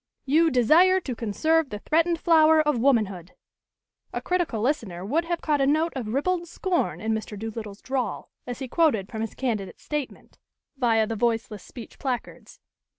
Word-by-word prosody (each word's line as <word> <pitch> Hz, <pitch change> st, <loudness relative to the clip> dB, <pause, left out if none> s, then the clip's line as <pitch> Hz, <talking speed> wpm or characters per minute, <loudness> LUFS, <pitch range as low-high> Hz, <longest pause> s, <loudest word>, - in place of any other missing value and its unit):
"You 320 Hz, +4 st, +4 dB
'DESIRE 320 Hz, +9 st, +5 dB
TO 265 Hz, -9 st, -5 dB
CONSERVE 310 Hz, +8 st, +1 dB
THE 210 Hz, -, -5 dB
THREATENED 330 Hz, +8 st, +1 dB
FLOWER 320 Hz, -2 st, +5 dB
OF 300 Hz, -5 st, +1 dB
WOMANHOOD.'" 210 Hz, -9 st, +1 dB, 0.8 s
A -, -, -3 dB
critical 350 Hz, -11 st, -1 dB
listener 215 Hz, -, -2 dB
would 315 Hz, +11 st, 0 dB
have 340 Hz, 0 st, -2 dB
caught 295 Hz, -3 st, +1 dB
a 270 Hz, -, +3 dB
note 315 Hz, +4 st, +2 dB
of 250 Hz, -5 st, -4 dB
ribald 345 Hz, +9 st, -1 dB
scorn 355 Hz, +1 st, -1 dB
in 220 Hz, +1 st, -1 dB
Mr. 220 Hz, -1 st, -4 dB
Doolittle's 215 Hz, -1 st, -7 dB
drawl, 260 Hz, -2 st, -3 dB, 0.2 s
as 245 Hz, -, -4 dB
he 265 Hz, -, -5 dB
quoted 245 Hz, -, +1 dB
from 220 Hz, -, -5 dB
his 225 Hz, -, -4 dB
candidate's 220 Hz, -7 st, -3 dB
statement, 295 Hz, -3 st, -6 dB, 0.4 s
via 230 Hz, -4 st, +2 dB
the 225 Hz, +1 st, -4 dB
voiceless 225 Hz, -2 st, -1 dB
speech 235 Hz, +3 st, -12 dB
placards. 255 Hz, -3 st, -5 dB
260 Hz, 165 wpm, -25 LUFS, 220-320 Hz, 0.8 s, DESIRE